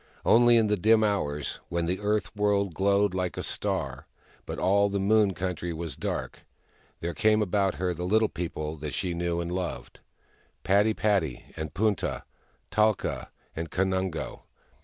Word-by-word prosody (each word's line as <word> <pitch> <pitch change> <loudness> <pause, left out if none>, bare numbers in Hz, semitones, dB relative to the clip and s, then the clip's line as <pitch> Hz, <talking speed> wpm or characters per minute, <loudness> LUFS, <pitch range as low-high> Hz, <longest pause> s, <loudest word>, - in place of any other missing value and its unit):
Only 120 0 +6
in 115 - +4
the 105 0 +1
dim 110 +4 +4
hours, 75 -9 -1
when 85 0 -1
the 90 +2 -1
earth 105 +1 -1
world 100 -2 +1
glowed 100 +2 +2
like 90 -1 -2
a - - -2
star, - - -2 0.4
but - - -4
all 100 +2 +3
the 100 0 -1
moon 100 -1 +3
country 85 0 -3
was 80 0 -4
dark, - - -4 0.6
there 85 +1 -2
came 110 +6 +3
about 95 -2 +1
her 90 +3 -1
the 85 +1 -5
Little 110 +4 +3
People 80 -4 -4
that 75 -1 -5
she 90 -2 -1
knew^ 85 0 -1
and 85 0 -3
loved— 90 -1 -4 0.6
Padi 105 +3 +3
padi, 90 - 0
and 80 -2 -6
Punta, 105 -3 0 0.5
Talka 110 -2 +1 0.3
and 80 0 -4
Kanungo. 95 -2 -1
95 Hz, 160 wpm, -27 LUFS, 85-105 Hz, 0.6 s, Only